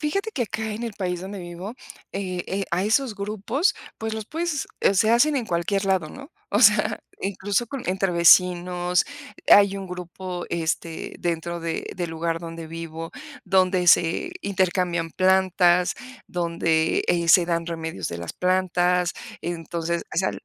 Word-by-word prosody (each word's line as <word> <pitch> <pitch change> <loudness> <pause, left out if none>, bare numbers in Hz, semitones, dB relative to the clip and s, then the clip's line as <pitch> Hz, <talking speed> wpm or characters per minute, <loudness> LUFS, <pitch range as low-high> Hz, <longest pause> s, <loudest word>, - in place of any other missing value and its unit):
Fíjate 395 +9 -1
que 260 - -1
acá 220 0 -4
en 215 +3 -5
el 230 -3 -4
país 180 -3 -3
donde 195 +2 -6
vivo, 175 +5 -7 0.4
eh, 185 -2 -3
eh, 195 +1 -2
a 180 +3 +1
esos 225 +2 +1
grupos, 215 - 0 0.2
pues, 220 0 -3
los 220 -1 -4
puedes 320 +2 -2
eh, 195 - +3
se 215 +3 +3
hacen 280 +6 +4
en 250 - -1
cualquier 195 +2 -1
lado, 190 -5 +1
¿no? 275 - -11 0.2
O 205 - +1
sea, 210 -3 +5 0.2
incluso 200 +3 -1
con, 270 +2 -6
entre 190 0 0
vecinos, 180 +1 +4 0.4
hay 200 -1 +6
un 195 -1 -6
grupo, 180 0 -6
este, 165 0 -3
dentro 170 0 -2
de 165 0 -3
del 175 -2 -2
lugar 165 +1 -2
donde 165 -1 -7
vivo, 165 0 -7 0.3
donde 185 -1 +2
se 170 - +4
intercambian 180 - 0
plantas, 185 -1 +3 0.3
donde, 170 -2 +1
eh, 170 -1 +1
se 175 +2 +7
dan 170 -1 -1
remedios 160 - -4
de 85 - -5
las 85 -1 -6
plantas. 180 -1 +1 0.3
Entonces, 170 0 -3
o - - -7
sea, 190 +2 +2
180 Hz, 160 wpm, -24 LUFS, 170-200 Hz, 0.4 s, se